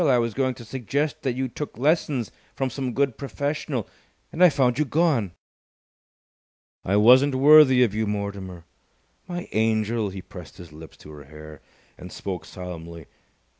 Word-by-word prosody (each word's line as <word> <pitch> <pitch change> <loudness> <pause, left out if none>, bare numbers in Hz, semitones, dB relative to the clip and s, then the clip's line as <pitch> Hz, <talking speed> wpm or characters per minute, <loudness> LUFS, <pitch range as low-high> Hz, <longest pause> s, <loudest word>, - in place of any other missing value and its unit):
I 130 -3 +4
was 115 -2 -1
going 130 0 -1
to 120 - -12
suggest 140 +6 -3
that 130 -3 -1
you 130 +1 -2
took 145 +2 -7
lessons 140 - 0 0.2
from 135 -1 -2
some 130 -1 -4
good 140 -3 0
professional. 140 - -3 0.4
And 175 - +1
I 180 - +9
found 130 -3 +1
you - - +4
gone!" 140 - +1 1.5
"I 95 - 0
wasn't 130 +6 +5
worthy 135 -2 +7
of 110 -5 0
you, 110 0 -1
Mortimer!" 100 -4 -5 0.6
"My 175 -1 -6
angel!" 110 0 0
He 95 -1 -8
pressed 90 0 -12
his 85 -4 -12
lips 80 +1 -13
to 75 - -14
her 75 -2 -12
hair, 75 0 -12 0.4
and 90 - -10
spoke 95 -4 -6
solemnly. 85 -3 -9
120 Hz, 160 wpm, -24 LUFS, 95-140 Hz, 1.5 s, I